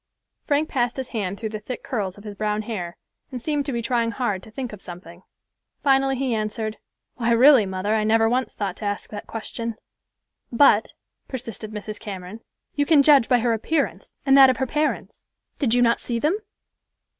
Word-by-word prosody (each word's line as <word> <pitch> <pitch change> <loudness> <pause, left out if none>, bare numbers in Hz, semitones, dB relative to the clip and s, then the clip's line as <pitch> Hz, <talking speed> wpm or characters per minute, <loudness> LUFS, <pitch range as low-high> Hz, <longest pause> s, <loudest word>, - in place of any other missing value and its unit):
Frank 295 +2 +1
passed 245 -3 -1
his 260 -1 -4
hand 200 -3 -3
through 220 - -3
the 215 0 -5
thick 240 +4 -7
curls 200 -6 -3
of 205 - -13
his 210 -1 -7
brown 210 +1 -1
hair, 180 -6 -5 0.3
and 255 - -4
seemed 290 +2 -1
to - - -1
be 235 -2 -2
trying 235 -1 +1
hard 230 -6 -2
to - - -14
think 245 +1 -6
of 205 - -10
something. 175 0 -11 0.6
Finally 270 -1 +3
he 260 -2 0
answered, 215 0 -2 0.4
"Why, 235 -1 0
really, 250 -2 +7
mother, 190 +3 -1
I 220 -1 +2
never 225 +1 +3
once 250 +3 -1
thought 195 -3 -3
to 215 - -6
ask 205 0 -3
that 205 -1 -7
question." 230 0 -4 0.8
"But," 235 -3 +4 0.3
persisted 230 -4 -6
Mrs. 215 0 -6
Cameron, 200 -1 -7 0.3
"you 285 -1 0
can 300 -4 +6
judge 280 -5 +6
by 245 -2 +4
her 235 0 +2
appearance, 280 +7 -2
and 270 -1 +5
that 270 -1 +9
of 255 - +1
her 265 - 0
parents. 300 +4 -2 0.4
Did 245 -5 +2
you 245 - +4
not 235 0 +3
see 235 - -3
them?" 305 +10 +1
230 Hz, 195 wpm, -23 LUFS, 210-260 Hz, 0.8 s, that